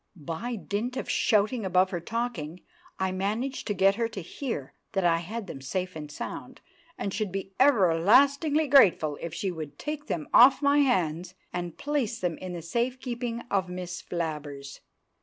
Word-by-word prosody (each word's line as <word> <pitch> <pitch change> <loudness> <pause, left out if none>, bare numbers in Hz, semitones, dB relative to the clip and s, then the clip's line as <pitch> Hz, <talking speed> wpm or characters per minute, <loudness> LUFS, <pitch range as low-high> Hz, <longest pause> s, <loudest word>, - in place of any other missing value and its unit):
By 170 - -4
dint 220 +5 -3
of - - -4
shouting 215 +2 +2
above 185 0 +2
her 175 - -2
talking 180 -5 -4 0.4
I 190 0 0
managed 215 +8 -2
to 205 - -1
get 195 +2 +4
her 230 -1 +1
to 210 -4 -7
hear 180 - -5 0.2
that 195 -3 +1
I 165 -1 +4
had 205 +6 -5
them 135 - -8
safe 185 +6 -3
and 150 -1 -7
sound; - - -7 0.4
and 195 - -3
should 215 -4 -2
be 195 0 -5
everlastingly 275 - +4
grateful 185 - +5
if 170 - -4
she 190 +1 -2
would 155 -4 -7
take 300 0 -5
them 155 -4 -3
off 255 +3 +8
my 285 0 +3
hands 180 - +1 0.2
and 175 -1 -4
place 280 -6 -1
them 175 -3 -2
in 185 -1 -6
the 170 -2 -6
safe 240 +9 -1
keeping 240 -2 -4
of 190 -2 +1
Miss 180 0 -5
Flabbers. 150 -5 -5
195 Hz, 175 wpm, -27 LUFS, 170-240 Hz, 0.4 s, off